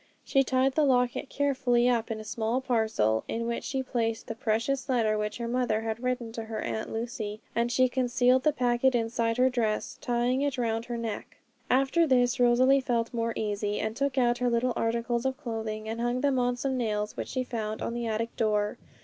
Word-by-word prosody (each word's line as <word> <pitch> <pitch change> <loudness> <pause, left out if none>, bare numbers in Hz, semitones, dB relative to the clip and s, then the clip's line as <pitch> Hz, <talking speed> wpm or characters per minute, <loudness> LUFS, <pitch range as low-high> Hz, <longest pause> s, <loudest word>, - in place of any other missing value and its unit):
She 270 - +3
tied 260 +1 +2
the 310 - +2
locket 250 -1 +1
carefully 255 -4 +2
up 235 -2 +1
in 220 -1 -3
a - - -7
small 225 +2 -1
parcel, 220 - +1
in 230 +1 -2
which 235 0 -2
she 265 -1 -2
placed 230 -3 -2
the - - -4
precious 230 +5 -1
letter 225 -4 +2
which 210 0 -2
her 235 -1 -4
mother 240 -3 0
had 225 +1 -3
written 250 -2 -2
to 225 0 -6
her 220 -1 -5
Aunt 220 - -3
Lucy, 225 -2 -4 0.2
and 235 +1 +1
she 255 +1 +4
concealed 250 0 +2
the 305 - +3
packet 250 -1 +2
inside 230 0 0
her 255 +1 +5
dress, 230 -4 -1
tying 245 +2 +1
it 285 -2 0
round 225 -1 -1
her 240 -1 -4
neck. 225 -3 -5 0.3
After 275 +6 +3
this 245 -2 +3
Rosalie 255 +3 +5
felt 235 -2 -1
more 230 -1 -1
easy, 205 -1 -2
and 220 0 -2
took 280 +1 -1
out 240 -1 +3
her 250 0 +2
little 240 +1 +1
articles 235 +1 0
of 265 0 -1
clothing, 220 -5 -4
and 225 +1 -3
hung 240 +1 0
them 275 -2 +2
on 245 0 +1
some 265 +1 -1
nails 210 -3 -1
which - - -4
she 255 - -2
found 220 -3 -4
on - - -2
the 235 -1 -3
attic 225 +1 -2
door. 210 -2 0
240 Hz, 210 wpm, -28 LUFS, 225-255 Hz, 0.3 s, her